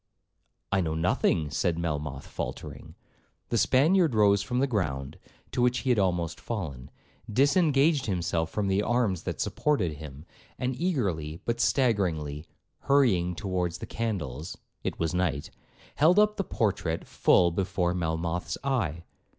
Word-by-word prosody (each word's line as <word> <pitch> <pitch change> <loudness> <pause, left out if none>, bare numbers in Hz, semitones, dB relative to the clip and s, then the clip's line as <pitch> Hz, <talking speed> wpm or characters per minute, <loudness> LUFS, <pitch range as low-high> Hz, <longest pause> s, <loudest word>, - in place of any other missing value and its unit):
'—'I 95 -1 +2
know 80 -2 -1
nothing,' 80 -2 +1
said 85 +1 0
Melmoth 75 -4 -3
faultering. - - -7 0.5
The 120 - +1
Spaniard 155 - +4
rose 100 -2 +4
from 125 +5 -3
the 135 - +3
ground, 75 - -2 0.3
to 125 - -1
which 125 0 +2
he 130 - +3
had 120 - +3
almost 85 -4 0
fallen, 75 - -5 0.4
disengaged 145 - +3
himself 85 -4 -1
from 105 +2 -2
the 95 +1 +2
arms 110 -5 +1
that - - -4
supported 95 - 0
him, 75 0 -10 0.3
and 125 0 -2
eagerly, 95 - -1
but 120 0 -1
staggeringly, 85 - +1 0.3
hurrying 100 -11 +2
towards 90 -2 -2
the - - -7
candles, 90 - -4 0.3
(it - - -3
was 80 -1 0
night), 85 -6 -1 0.5
held 165 +6 +5
up 210 0 +4
the 195 - -1
portrait 90 - -1
full 85 -1 +3
before 90 -1 0
Melmoth's 85 0 -2
eye. 110 - -1
95 Hz, 140 wpm, -28 LUFS, 80-125 Hz, 0.5 s, held